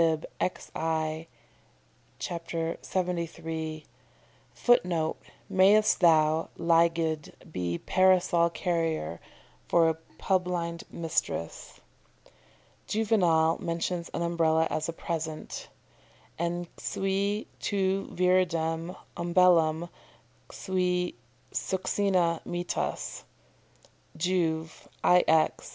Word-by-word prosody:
xi., 160 0 -1 0.9
ch. 180 - -4 0.5
73. 165 -3 -3 0.7
[Footnote: 175 -9 +2 0.3
"Mayst 200 +3 +4
thou, 160 -2 +4
Lygde, 165 -2 +1 0.2
be 85 - -2
parasol 185 - +3
carrier 165 - -2 0.5
for 165 -1 +4
a - - +1 0.2
publind 175 -3 -1
mistress."] 160 - -3 1.1
Juvenal 175 -7 +2
mentions 170 +1 -2
an 170 - -1
Umbrella 165 -1 +2
as 155 - -1
a - - -3
present: 160 -2 -5 0.7
"En 175 +1 -1
cui 200 +2 -1
tu 195 -1 0
viridem 175 -2 +1 0.2
umbellam 170 -2 +3 0.6
cui 180 -1 -1 0.4
succina 185 -3 0
mittas" 175 0 -3 0.9
Juv., 160 -2 -1 0.2
ix. 160 -3 +3
170 Hz, 70 wpm, -28 LUFS, 160-180 Hz, 1.1 s, Mayst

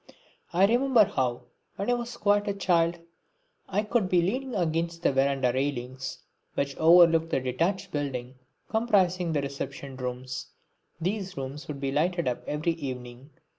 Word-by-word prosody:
I 180 +3 +5
remember 240 0 +4
how, 125 -7 -1 0.3
when 200 +5 -1
I - - +4
was 240 0 -4
quite 205 -1 +2
a 200 - -1
child, 175 -3 +2 0.7
I 195 +2 +1
would 210 -2 0
be 180 - +4
leaning 255 +6 -2
against 170 -1 -1
the - - +4
verandah 135 -2 +2
railings 130 -1 -3 0.4
which 140 -1 -1
overlooked 165 0 +6
the - - +1
detached 175 +10 -1
building 130 -4 -3 0.3
comprising 185 -6 +2
the 145 -3 0
reception 140 -1 -5
rooms. 125 0 -5 0.5
These 190 +1 -3
rooms 135 +2 -6
would 145 -2 -5
be 135 -1 -2
lighted 170 +3 +1
up 125 - -2
every 150 +3 0
evening. 130 -3 -7
165 Hz, 150 wpm, -27 LUFS, 135-195 Hz, 0.7 s, overlooked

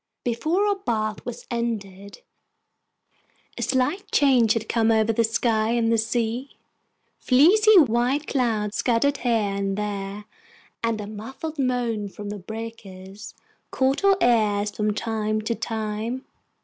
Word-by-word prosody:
Before 310 - 0
our 405 -1 +1
bath 215 - -2
was 245 - -6
ended 200 -4 -4 1.3
a - - -6
slight 290 +10 -1
change 250 -6 +4
had 225 -1 -3
come 225 -1 +1
over 220 0 +3
the 230 - +2
sky 225 0 +1
and 230 -1 +2
sea; 230 +3 -2 0.6
fleecy 395 - +5
white 260 0 +3
clouds 220 -7 -1
scudded 265 +4 +1
here 245 -2 -1
and 200 -3 0
there, 205 0 -4 0.6
and 230 -1 0
a 210 - -5
muffled 265 +9 -7
moan 240 -5 -1
from 205 +1 -8
the 205 0 -5
breakers 205 -2 -9 0.3
caught 270 +6 0
our 395 -1 +5
ears 210 -3 +2
from 210 +1 -1
time 215 -1 -1
to 215 +2 -1
time. 220 +3 -4
225 Hz, 130 wpm, -24 LUFS, 210-255 Hz, 1.3 s, fleecy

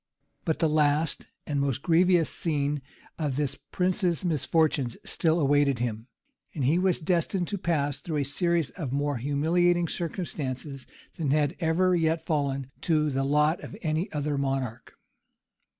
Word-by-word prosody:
But 160 -3 +1
the 165 - +2
last 150 0 +1 0.2
and 145 -2 -1
most 140 -1 -1
grievous 175 -1 +4
scene 145 -3 -1 0.4
of 145 -4 -1
this 145 -1 -1 0.2
prince's 180 -1 0
misfortunes 155 -5 +1
still 165 0 +1
awaited 145 -2 +3
him; 115 -1 -3 0.5
and 140 -5 -1
he 155 +7 +3
was 185 -2 +2
destined 175 +2 0
to 200 - -3
pass 145 -5 0
through 160 -3 -3
a 145 - +1
series 170 +2 0
of 150 -9 -5
more 145 0 0
humiliating 170 +6 +2
circumstances 145 -6 -4 0.3
than 155 -4 -1
had 150 +3 +2
ever 180 +2 +2
yet 160 -1 +1
fallen 140 -3 -1
to 155 -3 +2
the 135 0 0
lot 150 +4 +2
of 200 - -9
any 160 +4 -1
other 145 -1 -1
monarch. 135 -4 -3
150 Hz, 150 wpm, -27 LUFS, 140-170 Hz, 0.5 s, grievous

